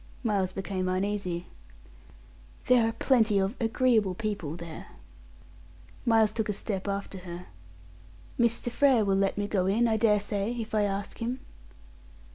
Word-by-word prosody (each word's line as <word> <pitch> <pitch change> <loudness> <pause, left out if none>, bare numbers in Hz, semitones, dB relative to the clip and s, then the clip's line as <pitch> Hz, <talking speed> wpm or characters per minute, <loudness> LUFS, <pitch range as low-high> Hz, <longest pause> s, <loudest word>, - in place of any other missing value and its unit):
Miles 200 -5 +1
became 190 -1 -3
uneasy. 185 -2 -2 1.2
"There 240 -3 +4
are - - -4
plenty 225 -6 +3
of 195 +4 0
agreeable 225 -4 +2
people 200 -8 -3
there." 170 -2 -8 1.2
Miles 220 -2 +4
took 220 -1 -2
a - - +1
step 195 -1 -3
after 200 -1 -3
her. 175 0 -8 0.9
"Mr. 235 0 +2
Frere 255 -4 +4
will 195 -1 +2
let 195 0 +1
me 205 0 -1
go 190 -3 0
in, 225 +5 +3
I 220 -1 +2
dare 210 -1 +4
say, 205 +2 -2
if 220 -1 -6
I 210 -1 +3
ask 200 0 -4
him." 245 +3 -2
205 Hz, 145 wpm, -28 LUFS, 190-225 Hz, 1.2 s, There